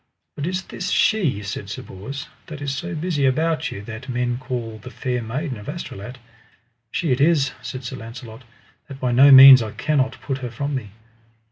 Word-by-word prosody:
But 145 - -4
is 185 +1 -2
this 185 - -5
she, 160 - +1
said 100 0 -6
Sir - - -6
Bors, 135 +10 -8 0.2
that 155 -2 -8
is 140 -1 -3
so 170 +5 -5
busy 160 -2 -1
about 160 +4 0
you, 100 - -7
that 115 +5 -9
men 120 0 -1
call 120 -4 -5
the 115 - -10
Fair 125 -1 -3
Maiden 125 +2 -4
of 105 - -9
Astolat? 125 - -7 0.7
She 160 +4 -1
it 130 +2 +1
is, 145 -3 +3
said 130 0 -7
Sir 130 +1 -6
Launcelot, 115 0 -10 0.4
that 135 -2 -10
by 125 -2 0
no 135 +4 +7
means 135 -1 +11
I 110 -1 -5
cannot 135 -4 0
put 135 +1 -4
her 125 -2 -5
from 140 +5 -4
me. 125 -6 -4
130 Hz, 195 wpm, -22 LUFS, 120-145 Hz, 0.7 s, means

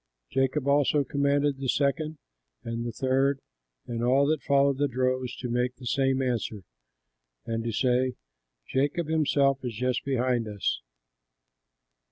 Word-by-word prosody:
'" - - -50
Jacob 135 +1 +1
also 145 +1 +3
commanded 140 0 +1
the 135 -2 -2
second, 150 +3 0 0.5
and 115 +1 -3
the - - -3
third, 135 +3 +1 0.5
and 120 0 -3
all 130 +3 +4
that 155 0 +1
followed 140 -1 +2
the 145 - +3
droves, 130 -1 -1
to 125 - -5
make 125 +1 0
the 130 - -12
same 135 +2 +1
answer, 115 -5 -2 0.8
and 115 0 -2
to 115 - -2
say, 125 +3 +1 0.5
"Jacob 145 +5 0
himself 140 -3 +2
is 120 -3 -4
just 125 +2 -1
behind 125 -3 0
us." 105 - -2
130 Hz, 145 wpm, -27 LUFS, 120-140 Hz, 0.8 s, all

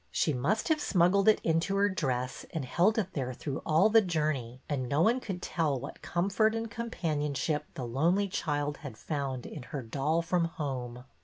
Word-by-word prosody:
She 155 - +1
must 180 - 0
have 310 -1 +2
smuggled 190 0 +3
it 215 - +6
into 165 +4 +1
her 200 +1 +4
dress 130 -9 -2
and 160 -5 -3
held 180 - +2
it 190 -4 -1
there 130 -3 -3
through 140 0 -4
all 160 +6 +5
the 225 +1 +6
journey, 150 - -1
and 130 -4 -2
no 145 - +1
one 235 +6 +3
could 190 -7 -5
tell 155 -5 0
what 140 +4 -8
comfort 200 +5 +1
and 225 -1 -3
com 235 0 -4
panionship 150 - -1
the 130 - -4
lonely 170 +12 +2
child 145 -5 -2
had 135 -8 -9
found 135 -4 -3
in 150 - -7
her 130 +2 -6
doll 145 +8 0
from 170 0 +1
home. 130 -6 -4
155 Hz, 190 wpm, -30 LUFS, 135-195 Hz, -, it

